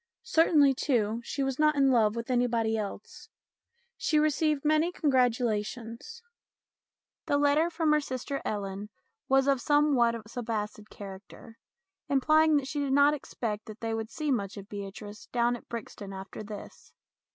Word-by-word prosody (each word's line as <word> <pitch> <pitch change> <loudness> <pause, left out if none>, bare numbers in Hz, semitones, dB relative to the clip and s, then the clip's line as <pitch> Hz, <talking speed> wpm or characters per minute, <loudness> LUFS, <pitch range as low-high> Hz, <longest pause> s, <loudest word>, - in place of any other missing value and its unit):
Certainly, 320 - +4
too, 235 -4 0
she 275 - -3
was 270 0 -2
not 305 0 +4
in 275 -1 +4
love 220 -3 +3
with 235 +2 -4
anybody 235 -3 +1
else. 210 -2 -6 0.7
She 305 - +1
received 305 -1 +1
many 310 +3 +3
congratulations. 245 - -1 1.0
The 285 - +2
letter 290 +3 +3
from 325 -2 +1
her 300 0 +4
sister 275 +1 -4
Ellen 200 0 -4 0.4
was 270 0 +4
of 275 -1 +4
a - - -10
somewhat 285 -6 +3
subacid 220 -2 -4
character, 200 +3 -11 0.5
implying 310 +3 +4
that 275 -2 -2
she 290 - -3
did 280 -2 0
not 285 +1 +5
expect 220 -7 -4
that 215 0 -10
they 225 -1 -2
would 225 0 -3
see 300 +1 -2
much 200 -5 -2
of 200 0 -9
Beatrice 205 +1 -8
down 240 0 +1
at 240 - -13
Brixton 205 -3 -7
after 190 +2 -8
this. 210 -1 -10
245 Hz, 150 wpm, -29 LUFS, 215-290 Hz, 1.0 s, not